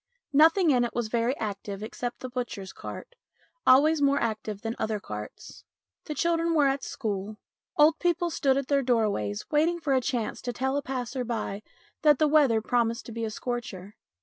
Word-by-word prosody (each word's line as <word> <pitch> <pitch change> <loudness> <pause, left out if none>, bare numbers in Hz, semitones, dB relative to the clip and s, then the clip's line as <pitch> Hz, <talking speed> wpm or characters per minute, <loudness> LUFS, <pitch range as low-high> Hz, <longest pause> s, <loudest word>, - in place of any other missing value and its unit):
Nothing 325 +3 +5
in 250 -2 +3
it 240 - -3
was 235 -3 -1
very 235 +4 0
active 200 -1 -5
except 240 +2 -5
the 255 - -5
butcher's 240 -6 -5
cart, - - -8 0.5
always 295 +4 +6
more 280 0 +3
active 215 -2 -3
than 225 +1 -3
other 215 -1 -1
carts. 105 - -9 0.4
The 300 - -5
children 335 0 +1
were 295 -2 +4
at 275 0 +1
school. 210 -3 -4 0.4
Old 305 +1 +5
people 345 -1 +1
stood 270 -3 +2
at 275 -1 -2
their 280 0 +2
doors 210 - 0
waiting 325 +3 +2
for 295 -4 0
a 260 - +3
chance 240 -3 -2
to 245 - -4
tell 265 +3 -1
a 285 - 0
passer 255 -1 -3
by 220 -4 -3 0.4
that 300 -3 +5
the 305 - +3
weather 285 -7 +4
promised 230 0 0
to - - -8
be 230 0 -3
a - - -2
scorcher. 215 -4 -5
245 Hz, 185 wpm, -27 LUFS, 220-290 Hz, 0.5 s, always